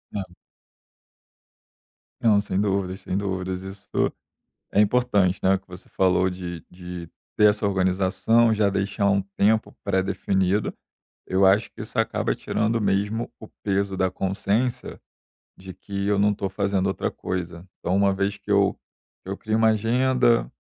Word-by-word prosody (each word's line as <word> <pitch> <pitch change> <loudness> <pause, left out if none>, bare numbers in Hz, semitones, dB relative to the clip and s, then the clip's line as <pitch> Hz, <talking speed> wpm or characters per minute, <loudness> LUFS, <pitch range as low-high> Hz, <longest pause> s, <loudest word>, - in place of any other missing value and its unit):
É. 100 - -1 2.0
Não, 110 -3 +5
sem 100 -1 -2
dúvidas, 95 -2 -1
sem 95 - -3
dúvidas, 95 -2 -3
isso 95 +1 -10 0.8
é 100 - +2
importante, 105 -4 +3
né, 95 +1 +4
o - - -3
que 100 - -34
você 90 0 -12
falou 95 0 +2
de 90 -3 -6
de 90 -2 -8 0.3
ter 105 0 +6
essa 105 0 0
organização, 95 +4 +2
já 105 -2 +2
deixar 100 +1 0
um 100 0 +3 0.2
tempo 110 +2 +2
predefinido, 95 0 0 0.5
eu 95 +1 +2
acho 100 +3 +3
que - - -14
isso - - -8
acaba - - +1
tirando 110 +1 -1
mesmo 105 +3 0
o 110 - -9 0.2
peso 100 -1 0
da 95 0 +2
consciência 100 +6 -2 0.6
de 95 0 -10
que 100 0 -5
eu 100 -1 +2
não 105 +1 +4
estou 100 -2 -3
fazendo 100 -1 0
outra 95 - -1
coisa. 90 -1 -5
Então 90 - -1
uma 100 0 +3
vez 100 +1 -1
que 105 - -12
eu 100 -1 +3 0.5
eu 95 +1 -4
crio 110 0 -1
uma 110 0 +5
agenda, 120 +2 +2
100 Hz, 150 wpm, -24 LUFS, 95-105 Hz, 2.0 s, ter